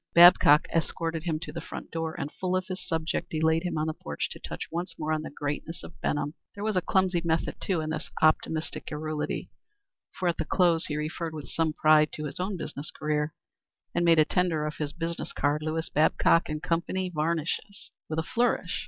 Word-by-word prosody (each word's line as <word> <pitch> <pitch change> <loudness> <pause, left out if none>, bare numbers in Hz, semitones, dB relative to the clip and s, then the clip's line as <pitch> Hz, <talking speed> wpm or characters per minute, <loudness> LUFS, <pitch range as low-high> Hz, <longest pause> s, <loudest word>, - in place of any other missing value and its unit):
Babcock 170 -4 +8
escorted 165 0 -1
him 160 -3 0
to - - -6
the - - -5
front - - -8
door 160 -1 -3
and 145 - -3
full 185 0 -2
of 185 0 0
his 185 -1 -5
subject 165 -1 -2
delayed 160 +1 +2
him 175 -2 -2
on 155 - +1
the 160 - -1
porch 75 - -4
to - - -7
touch - - -6
once 170 0 -4
more 155 0 -1
on 155 - 0
the 155 - -6
greatness 145 +3 -4
of - - -12
Benham. 145 0 -1 0.2
There 205 - -5
was 215 -1 0
a 185 - +3
clumsy 185 -1 +2
method 165 -1 -1
too 180 -5 0
in 155 0 -3
this 155 0 -4
optimistic 155 0 +1
garrulity, 155 0 -3 0.6
for 185 - -2
at 170 - +1
the - - 0
close 170 -1 +3
he 150 - -2
referred 155 +1 -3
with 150 -2 -7
some 160 -1 0
pride 155 0 +5
to 150 - -4
his 150 - -5
own 190 +1 -2
business 150 -2 -5
career, 150 0 -1 0.6
and 175 - +1
made 165 -1 +6
a 155 - +6
tender 170 -4 +1
of 150 - -4
his 150 -2 -2
business 165 +1 -4
card, 145 +1 +1
"Lewis 160 +1 -2
Babcock 160 +2 +3
& - - -10
Company, 175 +4 -1
Varnishes," 165 +5 -2 0.2
with 155 - -2
a 160 - +1
flourish. 235 -4 0
160 Hz, 210 wpm, -28 LUFS, 155-175 Hz, 0.6 s, Babcock